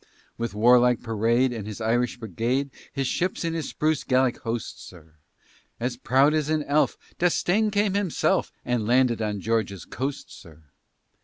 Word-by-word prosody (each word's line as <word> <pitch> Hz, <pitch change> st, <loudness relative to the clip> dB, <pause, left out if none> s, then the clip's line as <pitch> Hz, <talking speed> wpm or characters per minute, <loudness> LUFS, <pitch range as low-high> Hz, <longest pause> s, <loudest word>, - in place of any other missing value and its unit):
With 115 Hz, -3 st, -4 dB
warlike 125 Hz, +2 st, +4 dB
parade, 115 Hz, +3 st, +1 dB
And 110 Hz, -3 st, -6 dB
his 105 Hz, 0 st, -6 dB
Irish 120 Hz, +3 st, 0 dB
brigade, 120 Hz, +6 st, -2 dB, 0.2 s
His 135 Hz, -1 st, -2 dB
ships 180 Hz, +8 st, -1 dB
and 165 Hz, 0 st, -1 dB
his 160 Hz, -4 st, -3 dB
spruce 155 Hz, 0 st, 0 dB
Gallic 130 Hz, -1 st, +1 dB
host, 115 Hz, -1 st, -5 dB
sir, 80 Hz, -3 st, -15 dB, 0.6 s
As 125 Hz, +1 st, -2 dB
proud 135 Hz, +4 st, +3 dB
as 155 Hz, -1 st, 0 dB
an 155 Hz, -1 st, +1 dB
elf, 145 Hz, +2 st, +1 dB, 0.2 s
D'Estaing 180 Hz, +4 st, +2 dB
came 205 Hz, -1 st, +1 dB
himself, 200 Hz, -5 st, 0 dB
And 120 Hz, -3 st, -1 dB
landed 125 Hz, -1 st, +3 dB
on 105 Hz, -2 st, -2 dB
Georgia's 110 Hz, -5 st, -1 dB
coast, 135 Hz, +3 st, -5 dB
sir. 80 Hz, -1 st, -14 dB
125 Hz, 155 wpm, -25 LUFS, 115-145 Hz, 0.6 s, warlike